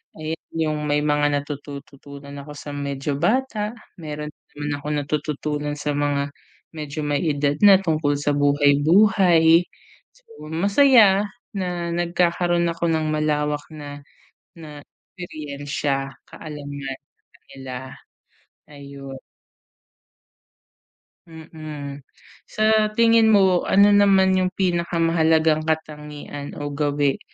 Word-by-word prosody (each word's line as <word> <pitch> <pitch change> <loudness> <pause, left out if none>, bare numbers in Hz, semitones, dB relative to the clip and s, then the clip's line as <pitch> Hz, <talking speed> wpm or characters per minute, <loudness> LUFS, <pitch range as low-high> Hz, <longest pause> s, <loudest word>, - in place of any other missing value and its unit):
ayan 155 +1 -4 0.2
yung 155 -2 -1
may 145 0 +1
mga 145 0 +2
natututuan 140 0 -10
ako 145 +1 -10
sa 145 0 -8
medyo 140 0 -3
bata, 215 +2 0 0.2
meron 150 -1 -6 0.2
naman 145 0 -4
akong 150 +1 -3
natututunan 150 0 -3
sa 150 0 -2
mga 145 -1 -1 0.4
medyo 150 0 -5
may 145 -1 0
edad 145 0 0
na 195 -2 +9
tungkol 155 -4 0
sa 145 +1 -1
buhay-buhay. 160 +4 +4 0.5
So - - -27 0.2
masaya 200 - +4 0.3
na 180 -4 -3
nagkakaroon 175 0 +1
ako 170 0 -2
ng 160 -1 0
malawak 150 -1 -1
na 145 -1 -9 0.5
na 150 -3 -11 0.4
eksperiyensiya, 145 -4 -4
kaalaman, 145 -3 -7 0.4
sa - - -23
kanila, 130 -2 -10 1.0
ayun. 140 -1 -10 2.1
Mm. 155 -3 -9 0.5
Sa 215 0 +2
tingin 230 -1 +5
mo, 190 -4 +4
ano 200 +1 +5
naman 195 -2 +4
yung 185 0 0
pinaka-mahalagang 165 -3 +1
katangian 150 -2 -5
o 145 0 -5
gawi 145 -1 0
155 Hz, 105 wpm, -22 LUFS, 145-175 Hz, 2.1 s, na